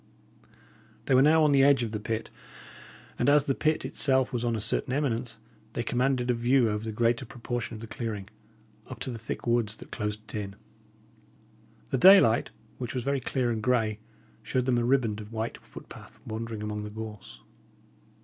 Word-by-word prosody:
They -, -, +1 dB
were 130 Hz, -, +6 dB
now 155 Hz, +3 st, +5 dB
on 150 Hz, -, +4 dB
the 140 Hz, -1 st, +5 dB
edge 135 Hz, -2 st, +5 dB
of 115 Hz, -, -3 dB
the 105 Hz, -, -3 dB
pit; 110 Hz, +1 st, -4 dB, 0.9 s
and -, -, +3 dB
as 145 Hz, 0 st, +5 dB
the 135 Hz, -, +1 dB
pit 155 Hz, +3 st, 0 dB
itself 130 Hz, -1 st, +1 dB
was 120 Hz, -1 st, -1 dB
on 120 Hz, -1 st, 0 dB
a -, -, -2 dB
certain 110 Hz, +3 st, -1 dB
eminence, 125 Hz, -4 st, -1 dB, 0.4 s
they 120 Hz, -, -2 dB
commanded 125 Hz, +1 st, +1 dB
a -, -, +2 dB
view 120 Hz, 0 st, +3 dB
over 105 Hz, +1 st, -3 dB
the 110 Hz, -, -4 dB
greater 115 Hz, +3 st, +1 dB
proportion 120 Hz, -2 st, -5 dB
of 110 Hz, -, -9 dB
the -, -, -6 dB
clearing, 110 Hz, -4 st, -5 dB, 0.6 s
up 130 Hz, -, -8 dB
to 130 Hz, -, -2 dB
the 115 Hz, -, -6 dB
thick 115 Hz, -, -6 dB
woods 115 Hz, -3 st, +1 dB
that -, -, -14 dB
closed 105 Hz, 0 st, -3 dB
it -, -, -13 dB
in. 100 Hz, -2 st, -4 dB, 1.4 s
The 130 Hz, -, +1 dB
daylight, 185 Hz, -, +7 dB, 0.3 s
which 125 Hz, 0 st, -5 dB
was 125 Hz, -, -2 dB
very 140 Hz, +1 st, 0 dB
clear 125 Hz, -1 st, -1 dB
and 110 Hz, -1 st, -2 dB
grey, 110 Hz, -2 st, +1 dB, 0.4 s
showed 130 Hz, -2 st, -1 dB
them 125 Hz, -2 st, +2 dB
a -, -, 0 dB
riband 120 Hz, -4 st, +1 dB
of 105 Hz, +1 st, -11 dB
white 115 Hz, 0 st, -4 dB
footpath -, -, -13 dB
wandering 110 Hz, -1 st, -5 dB
among 105 Hz, 0 st, -3 dB
the 105 Hz, -, -6 dB
gorse. 105 Hz, -1 st, -9 dB
120 Hz, 190 wpm, -28 LUFS, 110-130 Hz, 1.4 s, daylight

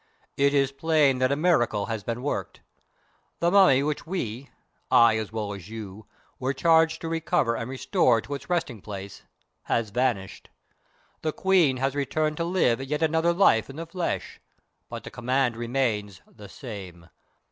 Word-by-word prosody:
"It 140 Hz, +1 st, +2 dB
is 135 Hz, -1 st, +2 dB
plain 145 Hz, -2 st, +2 dB
that 130 Hz, +1 st, +2 dB
a -, -, +2 dB
miracle 140 Hz, -, +2 dB
has 110 Hz, -3 st, -4 dB
been 120 Hz, +3 st, -4 dB
worked. 145 Hz, -, -4 dB, 0.8 s
The 170 Hz, +1 st, +1 dB
Mummy 180 Hz, -9 st, +6 dB
which 150 Hz, +2 st, -3 dB
we 135 Hz, -, -4 dB, 0.4 s
I 115 Hz, -1 st, +6 dB
as 110 Hz, -1 st, -5 dB
well 105 Hz, -2 st, -3 dB
as 100 Hz, -1 st, -10 dB
you 110 Hz, -2 st, -9 dB, 0.3 s
were 130 Hz, +1 st, -1 dB
charged 160 Hz, +2 st, +3 dB
to 165 Hz, -, -4 dB
recover 165 Hz, -7 st, 0 dB
and 115 Hz, +1 st, -4 dB
restore 130 Hz, -, +2 dB
to 145 Hz, -, -7 dB
its 140 Hz, -, -7 dB
resting 150 Hz, -, -1 dB
place, 100 Hz, -1 st, -8 dB, 0.4 s
has 115 Hz, -3 st, -1 dB
vanished. 120 Hz, -5 st, -2 dB, 0.7 s
The 155 Hz, -, -1 dB
Queen 175 Hz, -7 st, +3 dB
has 135 Hz, +1 st, 0 dB
returned 150 Hz, +2 st, -1 dB
to 170 Hz, -, -1 dB
live 165 Hz, -9 st, +1 dB
yet 150 Hz, +3 st, -2 dB
another 160 Hz, +2 st, +2 dB
life 170 Hz, -, +3 dB
in 135 Hz, -, -9 dB
the 165 Hz, +2 st, -5 dB
flesh, 170 Hz, +1 st, -4 dB, 0.5 s
but -, -, -7 dB
the -, -, -9 dB
command 125 Hz, 0 st, 0 dB
remains 115 Hz, -5 st, -2 dB
the 105 Hz, -3 st, -14 dB
same. 95 Hz, -8 st, -9 dB
135 Hz, 165 wpm, -26 LUFS, 115-160 Hz, 0.8 s, Mummy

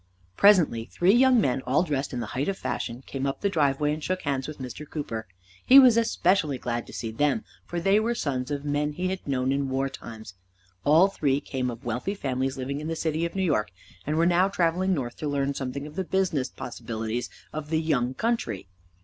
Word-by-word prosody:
Presently 170 Hz, -, +5 dB
three 175 Hz, -, +2 dB
young 255 Hz, 0 st, +5 dB
men, 135 Hz, -, +1 dB
all 135 Hz, +7 st, +3 dB
dressed 145 Hz, -5 st, -2 dB
in 125 Hz, -, -3 dB
the -, -, -3 dB
height 135 Hz, +3 st, -1 dB
of 195 Hz, -1 st, -1 dB
fashion, 120 Hz, -7 st, -4 dB
came 135 Hz, 0 st, -3 dB
up 135 Hz, -, -3 dB
the 200 Hz, -, +1 dB
driveway 150 Hz, -2 st, +2 dB
and 155 Hz, 0 st, -6 dB
shook 185 Hz, 0 st, -2 dB
hands 135 Hz, -2 st, -1 dB
with 155 Hz, -, -7 dB
Mr. 130 Hz, +3 st, -8 dB
Cooper. 115 Hz, -8 st, -4 dB, 0.4 s
He 265 Hz, -, +8 dB
was 255 Hz, -4 st, +9 dB
especially 185 Hz, -, +2 dB
glad 120 Hz, -1 st, -3 dB
to -, -, -10 dB
see 115 Hz, -, -4 dB
them, 145 Hz, -, +1 dB, 0.2 s
for 175 Hz, -, -3 dB
they 195 Hz, +4 st, +4 dB
were 230 Hz, +2 st, 0 dB
sons 130 Hz, -, -2 dB
of 145 Hz, 0 st, -3 dB
men 145 Hz, +1 st, 0 dB
he 180 Hz, +4 st, -2 dB
had 190 Hz, -4 st, -5 dB
known 130 Hz, -1 st, 0 dB
in 140 Hz, 0 st, 0 dB
war 135 Hz, +1 st, 0 dB
times. 110 Hz, -6 st, -10 dB, 0.5 s
All 160 Hz, +6 st, +6 dB
three 145 Hz, -8 st, 0 dB
came 130 Hz, -3 st, -3 dB
of 120 Hz, +2 st, -8 dB
wealthy 125 Hz, -, -2 dB
families 135 Hz, -5 st, -2 dB
living 140 Hz, +2 st, -3 dB
in 155 Hz, -, -5 dB
the 165 Hz, -, -2 dB
city 160 Hz, 0 st, -1 dB
of 170 Hz, -, -13 dB
New 190 Hz, -, 0 dB
York, 110 Hz, -, +1 dB, 0.4 s
and 155 Hz, +1 st, 0 dB
were 165 Hz, -, +4 dB
now 180 Hz, +2 st, +4 dB
traveling 185 Hz, 0 st, +1 dB
north 120 Hz, -5 st, -4 dB
to 155 Hz, -, -4 dB
learn 140 Hz, 0 st, 0 dB
something 135 Hz, +1 st, -4 dB
of 150 Hz, 0 st, -10 dB
the 190 Hz, -, -1 dB
business 180 Hz, -8 st, 0 dB
possibilities 115 Hz, 0 st, -4 dB, 0.2 s
of 150 Hz, -1 st, -5 dB
the 160 Hz, 0 st, +1 dB
young 130 Hz, -6 st, 0 dB
country. 175 Hz, -, -1 dB
145 Hz, 220 wpm, -26 LUFS, 130-175 Hz, 0.5 s, was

